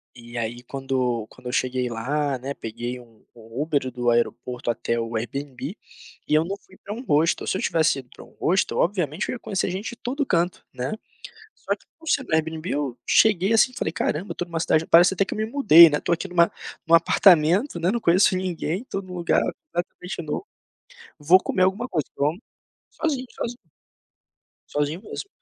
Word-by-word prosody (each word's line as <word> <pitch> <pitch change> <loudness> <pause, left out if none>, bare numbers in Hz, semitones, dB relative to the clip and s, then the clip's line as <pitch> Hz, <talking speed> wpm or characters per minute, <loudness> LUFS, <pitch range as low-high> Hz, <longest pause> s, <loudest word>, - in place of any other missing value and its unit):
E 120 0 -10
aí, 120 +1 -3
quando 130 -3 -2
quando 125 - -13
eu - - -3
cheguei 125 -1 0
lá, 135 +4 -1
né, 135 +3 -5
peguei 120 +2 -6
um 115 -3 -19
um 115 +3 -9
Uber 145 -4 0
do 120 -1 0
aeroporto 120 +1 -1
até 115 0 -1
o 115 0 -4
Airbnb, 135 - -5 0.5
e - - -1
eu 155 +2 +3
não 195 +2 -3
fui 190 -1 -21
para 205 - -7
um 245 +4 -7
hostel, 155 - +2
se 190 - 0
eu - - -4
tivesse 160 -4 +2
ido 125 -2 -9
para - - -12
um - - -20
hostel, 190 +3 +1
obviamente 175 -1 0
eu - - -2
ia 245 - -6
conhecer 190 -2 -2
gente 195 +4 -4
de 240 - -8
todo 265 +5 -2
canto, 175 -6 0
né? 125 +1 -4 0.6
Só - - -3
que - - -27
por 325 -1 -9
ser 280 - +2
no 155 - -2
Airbnb, 160 +1 -1
eu 140 -4 -2
cheguei 210 -1 +4
assim 225 +3 +4
e - - -17
falei: 160 - -2
"Caramba, 170 +5 -2
estou 175 - -5
numa 165 -1 -3
cidade 160 -1 +2
parece 175 +3 +6
até 190 - +1
que - - -4
eu - - -6
me 215 - 0
mudei, 200 - +8
né, 150 - 0
tô - - -1
aqui 170 +3 -1
num 180 - -11 0.5
num 165 - +4
apartamento, 170 - +4
né, 175 +3 +1
não 235 +1 -1
conheço 185 +1 +4
ninguém, 185 +2 -2
tô 195 -6 -4
num 185 -1 -11
lugar 175 -1 +1 0.3
completamente 175 0 -4
novo. 155 - -4 0.7
Vou 165 +6 +6
comer 185 - 0
alguma 200 +7 +1
coisa 155 -5 -1
que - - -17
eu 140 - +4
amo" 170 +10 -2 0.5
sozinho, 280 -5 -2
sozinho, 240 +1 -5 1.1
sozinho 150 +6 -2
mesmo, 400 - -7
165 Hz, 205 wpm, -24 LUFS, 130-190 Hz, 1.1 s, mudei